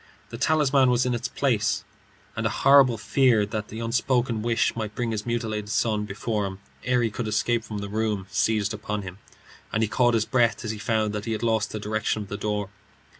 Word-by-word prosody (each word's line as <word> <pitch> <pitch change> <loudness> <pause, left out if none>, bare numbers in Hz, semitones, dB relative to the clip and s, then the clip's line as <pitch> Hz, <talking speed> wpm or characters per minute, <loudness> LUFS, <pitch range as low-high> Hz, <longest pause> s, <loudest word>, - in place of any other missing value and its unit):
The 115 - -7
talisman 140 -3 +3
was 125 0 +2
in 125 - 0
its 120 - -2
place, - - 0 0.5
and - - 0
a - - -1
horrible 135 -4 +5
fear 115 0 +3
that 105 0 -4
the 110 +2 -7
unspoken 120 0 0
wish 115 +1 +1
might 110 -2 -4
bring 120 -2 -1
his 110 0 -4
mutilated 110 -3 -2
son 105 -1 0
before 105 0 -2
him 95 0 -7 0.3
ere 125 -1 +2
he 115 - 0
could 115 +1 -4
escape 115 +2 +1
from 110 -2 -6
the 100 0 -4
room 105 -2 -1
seized 110 -1 +1
upon 105 -1 -4
him, 90 +1 -9 0.5
and 110 - +1
he - - +2
caught 120 +2 +2
his 110 -1 +1
breath 120 -3 +1
as 110 - -1
he 110 - -6
found 110 0 0
that 105 0 -4
he 115 - -1
had 110 - -4
lost 110 -2 +1
the 110 - -4
direction 110 0 -1
of 100 - -13
the 100 - -4
door. 105 -1 -2
110 Hz, 220 wpm, -25 LUFS, 105-120 Hz, 0.5 s, horrible